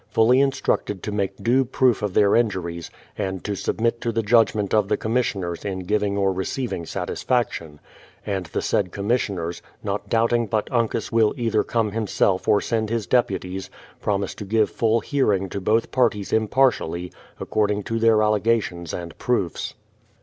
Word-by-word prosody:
^fully 120 +4 +5
instructed 130 -7 0
to 105 - -3
make 100 -2 -2
due 125 +3 +4
proof 130 -2 +2
of 105 -3 -2
their 100 -1 +5
injuries, 90 -8 -1 0.3
and 95 -2 -3
to 105 - -2
submit 115 +4 -1
to 120 - -1
the 115 0 -1
judgment 105 -2 +3
of 105 -3 +3
the - - +1
commissioners 100 -7 -1
in 95 -2 -3
giving 100 +1 0
or 95 -1 +2
re 95 +1 -2
ceiving 115 -11 -3
satisfaction; 85 -12 -2 0.5
and 95 -4 -2
the - - -3
said 90 -4 0
commissioners, 100 -5 -2 0.2
not 100 0 -3
doubting 115 0 +2
but 105 +1 -1
Uncas 115 -1 0
will 115 -2 +3
either 115 -3 +1
come 110 -3 0
himself 100 -3 0
or 105 - +5
send 110 -1 -1
his 115 -2 -1
deputies, 95 -4 0 0.3
promise 100 -1 -1
to - - -8
give 110 +2 +1
full 115 0 +1
hearing 105 -9 +1
to 100 - -4
both 110 +4 +1
parties 110 -6 +1
impartially, 110 -7 +1 0.3
according 105 -1 0
to 115 +2 -2
their 110 -1 +4
allegations 105 -6 0
and 85 -1 -7
proofs. 110 -8 -1
105 Hz, 165 wpm, -23 LUFS, 95-115 Hz, 0.5 s, ^fully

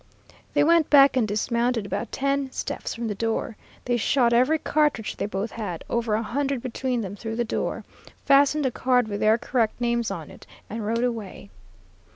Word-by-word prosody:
"They 290 - +5
went 330 0 +4
back 275 -2 +7
and 240 -4 +2
dismounted 235 +2 0
about - - -4
ten 275 0 -1
steps - - -4
from 230 0 -4
the 210 - -2
door. 225 +2 -2 0.3
They 245 -1 +1
shot 240 +1 +2
every 255 +7 +4
cartridge 295 -8 0
they - - -3
both 205 +2 -3
had, 200 -7 -5
over 230 -2 0
a 220 - -1
hundred 270 +2 -2
between 255 -1 -2
them, 200 -1 -5
through 225 +1 -5
the 240 - 0
door, - - -3 0.4
fastened 285 +1 +4
a 260 - +1
card 250 -1 +1
with 205 -1 -4
their 215 +1 +4
correct 240 -1 -1
names 235 -1 0
on - - -6
it, - - -15 0.2
and 225 -1 -4
rode 230 +3 0
away. 220 - -4
235 Hz, 190 wpm, -25 LUFS, 220-265 Hz, 0.4 s, back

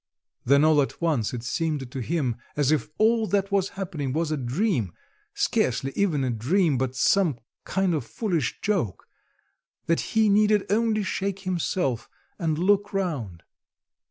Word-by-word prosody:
Then 140 +3 +5
all 155 -2 +5
at 135 - -3
once 150 -10 0
it 120 -2 -5
seemed 145 0 -2
to 135 - -5
him 130 -3 -1 0.2
as 145 -1 +2
if 155 - 0
all 225 0 +3
that 200 -1 0
was 195 -1 +1
happening 155 -9 -3
was 160 +1 -1
a - - +1
dream, 130 - -1 0.4
scarcely 130 +2 0
even 165 -9 +1
a 130 - 0
dream, 140 - +1
but 130 0 -2
some 165 0 +3 0.3
kind 190 -2 +1
of 150 -5 -1
foolish 160 - -2
joke; 185 - -1 0.8
that 165 - +2 0.2
he 220 -1 +5
need 210 0 +3
only 215 0 +2
shake 195 0 -2
himself 170 - -1 0.3
and 160 -4 0
look 205 +4 +2
round... 130 - -3
165 Hz, 155 wpm, -25 LUFS, 130-195 Hz, 0.8 s, Then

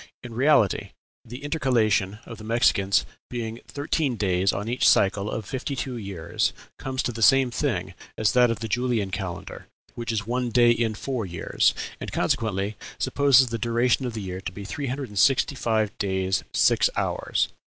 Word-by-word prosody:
In 120 -1 -8
reality, 125 -5 +2 0.3
the 125 +4 -10
intercalation 115 - +1
of 115 -2 -9
the - - -10
Mexicans 105 -4 +2 0.2
being 115 -1 -4
thirteen 145 -2 -1
days 95 -2 +1
on 105 +2 -4
each 120 +2 +3
cycle 100 +1 +2
of 110 -1 -4
fifty 135 +4 -4
two 130 -1 -4
years, 95 -6 -2 0.3
comes 130 0 -2
to - - -1
the 115 -1 -7
same 135 +2 +5
thing 110 - -2 0.2
as 110 -1 +2
that 125 -2 +4
of 115 -1 -2
the 115 - -3
Julian 115 -3 0
calendar, 95 -2 -6 0.3
which 120 0 -4
is 105 -2 -2
one 125 +2 -1
day 120 0 +5
in 115 -2 0
four 125 -4 -3
years; 85 -1 +1 0.2
and - - -6
consequently 110 -6 -1 0.2
supposes 135 -3 +4
the 115 0 -3
duration 120 +2 +1
of 120 - -5
the 110 - -4
year 95 0 -5
to 95 - -5
be 100 +2 -8
three 140 +7 -4
hundred 135 +1 -4
and 105 -1 -3
sixty 135 +3 +4
five 110 -4 0
days 95 -1 0
six - - +3
hours. - - 0
115 Hz, 180 wpm, -25 LUFS, 100-125 Hz, 0.3 s, same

